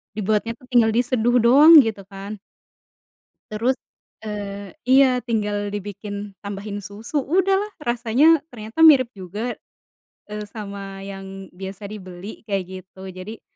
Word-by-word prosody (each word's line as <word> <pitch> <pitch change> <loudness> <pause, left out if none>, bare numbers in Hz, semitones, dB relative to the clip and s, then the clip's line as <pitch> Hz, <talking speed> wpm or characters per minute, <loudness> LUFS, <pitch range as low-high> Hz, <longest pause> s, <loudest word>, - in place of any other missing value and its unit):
dibuatnya 215 +2 0
tu, - - -23
tinggal 235 -3 +5
diseduh 245 0 +2
doang 285 +7 +8
gitu 220 -3 -4
kan. 200 +1 -8 1.1
Terus, 235 +5 +1 0.5
eee 205 -2 -6 0.2
iya, 260 -1 +5
tinggal 210 -4 -2
dibikin, 205 0 -6
tambahin 200 0 -6
susu, 210 +8 -4
udahlah. 380 +7 +1 0.2
Rasanya 245 +7 +3
ternyata 225 0 -9
mirip 280 -7 +7
juga, 205 +4 -6 0.7
eee, 210 0 -5
sama 200 -2 -8
yang 195 -1 -8
biasa 190 +2 -8
dibeli, 195 0 -9
kayak 195 -3 -1 0.2
gitu. 190 +1 -11
Jadi 185 +4 -9
210 Hz, 120 wpm, -22 LUFS, 200-240 Hz, 1.1 s, doang